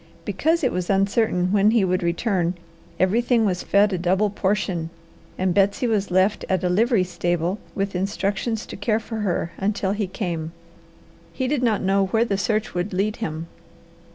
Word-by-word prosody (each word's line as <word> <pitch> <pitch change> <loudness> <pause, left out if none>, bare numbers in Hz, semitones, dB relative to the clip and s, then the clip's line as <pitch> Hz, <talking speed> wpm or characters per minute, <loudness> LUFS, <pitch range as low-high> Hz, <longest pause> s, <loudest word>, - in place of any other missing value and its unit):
Because 315 - +1
it 255 - +2
was 180 -1 -3
uncertain 195 -2 +2
when 205 0 +4
he 220 -3 +3
would 185 +1 0
return, 175 0 0 0.4
everything 230 +5 +2
was 180 -3 0
fed 200 0 +3
a 180 - -1
double 190 +4 +1
portion, 190 -4 -1 0.5
and 185 -1 +1
Betsy 200 +5 +2
was 210 -4 0
left 185 +3 +2
at 185 -1 +1
a 180 - +1
livery 220 +2 +3
stable 175 +1 -1 0.2
with 195 -1 -2
instructions 200 +4 -1
to - - -8
care 215 +2 0
for 225 0 -6
her 180 -5 -1
until 200 -1 0
he 205 -1 -1
came. 170 -4 -4 0.8
He 260 - -2
did 280 -1 0
not 225 -5 +1
know 195 0 +2
where 225 +4 +2
the 200 - -1
search 215 +1 -1
would 180 +3 -2
lead 210 +4 0
him. 160 -7 -4
195 Hz, 175 wpm, -23 LUFS, 180-215 Hz, 0.8 s, when